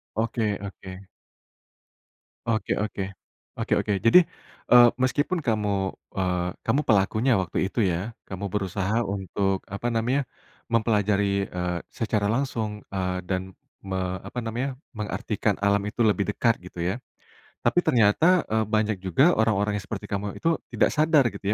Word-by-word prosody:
Oke 110 Hz, -2 st, 0 dB
oke. 95 Hz, -1 st, -8 dB, 1.5 s
Oke 110 Hz, 0 st, 0 dB
oke. 105 Hz, -2 st, -3 dB, 0.5 s
Oke -, -, -2 dB
oke. 105 Hz, -, 0 dB
Jadi, 115 Hz, +10 st, +9 dB, 0.5 s
eee, 120 Hz, -1 st, +9 dB
meskipun 145 Hz, +7 st, +1 dB
kamu, 100 Hz, -4 st, 0 dB, 0.2 s
eee, 90 Hz, -1 st, 0 dB, 0.2 s
kamu 135 Hz, +6 st, +2 dB
pelakunya 110 Hz, +3 st, +3 dB
waktu 95 Hz, +1 st, -1 dB
itu 120 Hz, -, -4 dB
ya, 95 Hz, +6 st, -2 dB
kamu 95 Hz, +1 st, -5 dB
berusaha 100 Hz, +3 st, -1 dB
untuk 95 Hz, 0 st, -1 dB
apa 100 Hz, +5 st, -3 dB
namanya, 125 Hz, +5 st, +1 dB, 0.5 s
mempelajari, 105 Hz, -3 st, +2 dB
eee, 90 Hz, -1 st, -3 dB
secara 110 Hz, -2 st, -1 dB
langsung, 115 Hz, -5 st, -2 dB
eee, 90 Hz, -1 st, -2 dB
dan 95 Hz, 0 st, -2 dB, 0.3 s
me 95 Hz, -1 st, -2 dB
apa 125 Hz, -, -5 dB
namanya, 120 Hz, +4 st, -3 dB, 0.2 s
mengartikan 105 Hz, 0 st, -1 dB
alam 100 Hz, 0 st, +2 dB
itu 105 Hz, +3 st, -3 dB
lebih 105 Hz, -2 st, +3 dB
dekat 115 Hz, +1 st, +2 dB
gitu 90 Hz, -, -10 dB
ya. 90 Hz, +4 st, 0 dB, 0.7 s
Tapi 175 Hz, -, +3 dB
ternyata, 140 Hz, -, +4 dB
eee, 110 Hz, -1 st, +2 dB
banyak 110 Hz, -1 st, +1 dB
juga 130 Hz, -, +4 dB
orang-orang 105 Hz, -2 st, +2 dB
yang -, -, -10 dB
seperti -, -, -5 dB
kamu 100 Hz, 0 st, -3 dB
itu 165 Hz, 0 st, 0 dB
tidak -, -, +3 dB
sadar 155 Hz, -2 st, +4 dB
gitu -, -, -11 dB
105 Hz, 140 wpm, -25 LUFS, 95-115 Hz, 1.5 s, Jadi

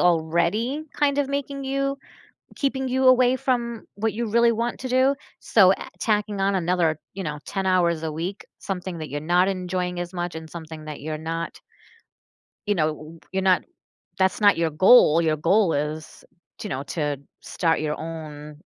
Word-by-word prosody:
already 175 Hz, -, +1 dB
kind 285 Hz, -1 st, +1 dB
of 285 Hz, -2 st, +1 dB
making 280 Hz, 0 st, -3 dB
you 275 Hz, +1 st, -1 dB, 0.6 s
keeping 265 Hz, -2 st, -1 dB
you 260 Hz, +1 st, +2 dB
away 255 Hz, 0 st, +5 dB
from 235 Hz, -3 st, -1 dB
what 220 Hz, +2 st, 0 dB
you 230 Hz, +1 st, -3 dB
really 235 Hz, +2 st, +4 dB
want 230 Hz, +1 st, -2 dB
to 255 Hz, -, -4 dB
do, 260 Hz, +2 st, +3 dB, 0.2 s
so, 190 Hz, -4 st, +5 dB
eh, -, -, -3 dB
tacking 210 Hz, -2 st, 0 dB
on 195 Hz, +1 st, +2 dB
another, 170 Hz, -3 st, +1 dB
you 195 Hz, -, -5 dB
know, 150 Hz, -2 st, -4 dB
10 195 Hz, -1 st, -3 dB
hours 170 Hz, -3 st, +2 dB
a 160 Hz, -, -2 dB
week, 170 Hz, +6 st, -5 dB
something 185 Hz, -2 st, -4 dB
that 155 Hz, -1 st, -6 dB
you're 145 Hz, +1 st, -4 dB
not 175 Hz, +4 st, +3 dB
enjoying 180 Hz, -1 st, -2 dB
as 175 Hz, +1 st, -6 dB
much 175 Hz, -1 st, -3 dB
and 160 Hz, 0 st, -8 dB
something 160 Hz, -2 st, -9 dB
that 150 Hz, -2 st, -7 dB
you're 155 Hz, +1 st, -4 dB
not 165 Hz, +2 st, -5 dB, 1.1 s
you 205 Hz, -, +2 dB
know, 155 Hz, -4 st, +2 dB
w 155 Hz, +2 st, -12 dB
you're 190 Hz, 0 st, 0 dB
not 185 Hz, -1 st, +4 dB, 0.6 s
that's 190 Hz, +2 st, +1 dB
not 205 Hz, -1 st, +6 dB
your 165 Hz, -1 st, +1 dB
goal. 165 Hz, 0 st, +6 dB
Your 155 Hz, -2 st, +1 dB
goal 190 Hz, +3 st, +3 dB
is, 150 Hz, +2 st, -4 dB, 0.4 s
to 210 Hz, -, -5 dB
know, 135 Hz, -5 st, -3 dB
to 145 Hz, 0 st, -2 dB, 0.2 s
start 165 Hz, -2 st, 0 dB
your 150 Hz, -1 st, -2 dB
own 150 Hz, -2 st, -8 dB
180 Hz, 180 wpm, -24 LUFS, 160-230 Hz, 1.1 s, not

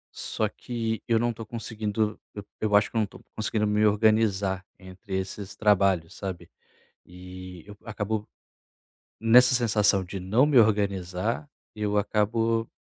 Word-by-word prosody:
Só -, -, -2 dB
que 115 Hz, -2 st, -4 dB
eu 115 Hz, -1 st, +3 dB
não 120 Hz, +1 st, +1 dB
estou 115 Hz, 0 st, -8 dB
conseguindo, 110 Hz, -1 st, -3 dB, 0.2 s
eu 105 Hz, -, -7 dB, 0.2 s
eu 105 Hz, -1 st, +2 dB
acho 105 Hz, +1 st, +3 dB
que -, -, -18 dB
não 110 Hz, -, +3 dB
estou 100 Hz, -, -8 dB, 0.2 s
conseguindo 110 Hz, 0 st, -1 dB
me 105 Hz, 0 st, +1 dB
organizar 105 Hz, -3 st, +2 dB
entre 95 Hz, +1 st, -8 dB
esses 95 Hz, +1 st, -6 dB
trabalhos, 95 Hz, -5 st, +2 dB
sabe. 95 Hz, -3 st, -7 dB, 0.5 s
E 90 Hz, -1 st, -11 dB
eu 105 Hz, 0 st, -11 dB
acabo, 105 Hz, -1 st, -3 dB, 0.9 s
nessa 125 Hz, +3 st, +6 dB
sensação 105 Hz, -5 st, +2 dB
de 95 Hz, +2 st, -6 dB
não 105 Hz, +9 st, +3 dB
me 145 Hz, -4 st, +5 dB
organizar, 95 Hz, -, 0 dB, 0.3 s
eu 105 Hz, -1 st, -1 dB
acabo 115 Hz, +2 st, 0 dB
105 Hz, 140 wpm, -26 LUFS, 95-110 Hz, 0.9 s, nessa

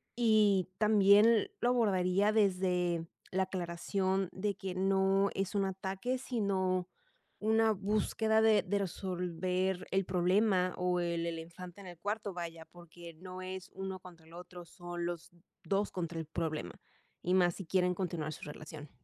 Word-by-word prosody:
Y 215 Hz, -6 st, +3 dB
también 210 Hz, +1 st, +5 dB
lo 240 Hz, -, +3 dB
abordaría 200 Hz, -4 st, +2 dB
desde 180 Hz, -5 st, +1 dB, 0.2 s
la 190 Hz, +1 st, +2 dB
aclaración 185 Hz, +1 st, -1 dB
de 205 Hz, +2 st, -1 dB
que 190 Hz, -1 st, -5 dB
no 195 Hz, +1 st, +3 dB
es 195 Hz, +1 st, -2 dB
un 200 Hz, -1 st, +2 dB
ataque, 195 Hz, +6 st, -3 dB
sino 190 Hz, -7 st, 0 dB, 0.5 s
una 220 Hz, +1 st, +3 dB
búsqueda 215 Hz, +2 st, +1 dB
de 220 Hz, -2 st, +5 dB
de 200 Hz, +2 st, 0 dB
resolver 185 Hz, 0 st, -2 dB
el 195 Hz, 0 st, +1 dB
problema, 185 Hz, +1 st, +2 dB
o 180 Hz, 0 st, +1 dB
el 170 Hz, -1 st, -1 dB
el 165 Hz, -1 st, -3 dB
infante 175 Hz, +3 st, -10 dB
en 190 Hz, -, -10 dB
el 175 Hz, -2 st, -10 dB
cuarto, 205 Hz, +1 st, -3 dB
vaya, 165 Hz, -2 st, -6 dB
porque 175 Hz, -1 st, -12 dB
no 185 Hz, +2 st, -9 dB
es 185 Hz, 0 st, -6 dB
uno 190 Hz, 0 st, -5 dB
contra 175 Hz, -3 st, -14 dB
el 165 Hz, -, -17 dB
otro, 180 Hz, 0 st, -10 dB
son 175 Hz, 0 st, -6 dB
los 175 Hz, -1 st, -5 dB, 0.4 s
2 200 Hz, +1 st, 0 dB
contra 170 Hz, -2 st, -4 dB
el 160 Hz, -, -4 dB
problema. 155 Hz, -, -4 dB, 0.4 s
Y 180 Hz, -, 0 dB
más 175 Hz, -2 st, +4 dB
si 195 Hz, -, -7 dB
quieren 180 Hz, +1 st, +2 dB
continuar 170 Hz, -4 st, -3 dB
su -, -, -11 dB
relación. 150 Hz, 0 st, -9 dB
185 Hz, 155 wpm, -33 LUFS, 175-200 Hz, 0.5 s, también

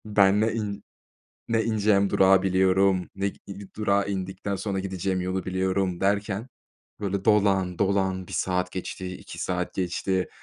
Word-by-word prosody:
Ben 105 Hz, -1 st, +4 dB
ne 110 Hz, +1 st, +2 dB
in 105 Hz, -3 st, -4 dB, 0.6 s
ne 115 Hz, -1 st, +1 dB
ineceğim 105 Hz, -3 st, +2 dB
durağı 95 Hz, 0 st, +5 dB
biliyorum, 95 Hz, 0 st, +2 dB
ne 100 Hz, +1 st, 0 dB
gi -, -, -16 dB
i 100 Hz, 0 st, -9 dB
durağı 100 Hz, -2 st, +1 dB
indikten 95 Hz, +1 st, -3 dB
sonra 95 Hz, 0 st, -2 dB
gideceğim 95 Hz, -1 st, -2 dB
yolu 95 Hz, +1 st, -2 dB
biliyorum. 95 Hz, -1 st, 0 dB
Derken, 100 Hz, +3 st, 0 dB, 0.5 s
böyle, 100 Hz, -2 st, -2 dB
dolan 95 Hz, -4 st, +3 dB
dolan 95 Hz, -2 st, +1 dB
1 -, -, -11 dB
saat 90 Hz, -1 st, 0 dB
geçti, 95 Hz, 0 st, -5 dB
2 -, -, -10 dB
saat -, -, -2 dB
geçti. 95 Hz, +1 st, -1 dB
95 Hz, 150 wpm, -26 LUFS, 95-100 Hz, 0.6 s, durağı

